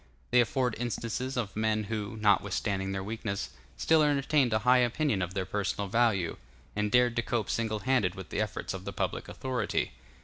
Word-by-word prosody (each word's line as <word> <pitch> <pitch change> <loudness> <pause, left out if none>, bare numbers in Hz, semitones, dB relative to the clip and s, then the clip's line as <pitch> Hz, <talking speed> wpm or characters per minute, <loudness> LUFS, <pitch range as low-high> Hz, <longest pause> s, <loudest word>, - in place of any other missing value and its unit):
They 125 0 +6
afford 120 +2 0
instances 120 +2 -3
of 105 -5 -2
men 110 0 +1
who, 105 +1 -4
notwithstanding 100 -1 +1
their 95 0 -3
weakness, 100 -4 -4 0.3
still 160 - +4
entertained 145 -3 +3
a 110 - +3
high 125 0 +6
opinion 125 -3 +1
of 90 +1 -3
their 95 -1 -1
personal 100 +1 -2
value, 105 -6 +2 0.4
and 105 0 0
dared 125 0 +4
to - - +3
cope 115 -2 -1
single 110 -2 -1
handed 120 -9 +2
with 95 -1 -8
the - - -1
efforts 105 -2 -3
of 95 -1 -6
the 100 - -4
public - - -2
authority. 125 -5 -1
110 Hz, 180 wpm, -30 LUFS, 100-125 Hz, 0.4 s, They